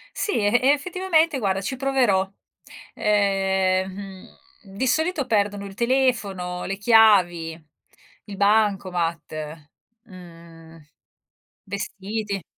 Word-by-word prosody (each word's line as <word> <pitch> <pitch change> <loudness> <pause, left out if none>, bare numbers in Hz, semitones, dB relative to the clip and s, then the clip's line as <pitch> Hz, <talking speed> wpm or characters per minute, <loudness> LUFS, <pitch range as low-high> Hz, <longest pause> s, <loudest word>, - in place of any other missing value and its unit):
Sì, 415 - -2
e 230 +5 +2
effettivamente 330 0 +1
guarda 195 -3 -1
ci 260 - -4
proverò. 250 -8 +1 0.7
Ehm, 190 -2 +1
mhmm, 195 -1 -11 0.4
di 260 - 0
solito 315 +2 0
perdono 205 -3 0
il 195 - -9
telefono, 215 -8 -1
le 195 - -4
chiavi, 200 -7 +4 0.7
il 205 - -8
bancomat, 175 -7 -1 0.4
mhmm, 165 -3 -14 0.9
vestiti. 200 0 -5
200 Hz, 90 wpm, -23 LUFS, 185-235 Hz, 0.9 s, chiavi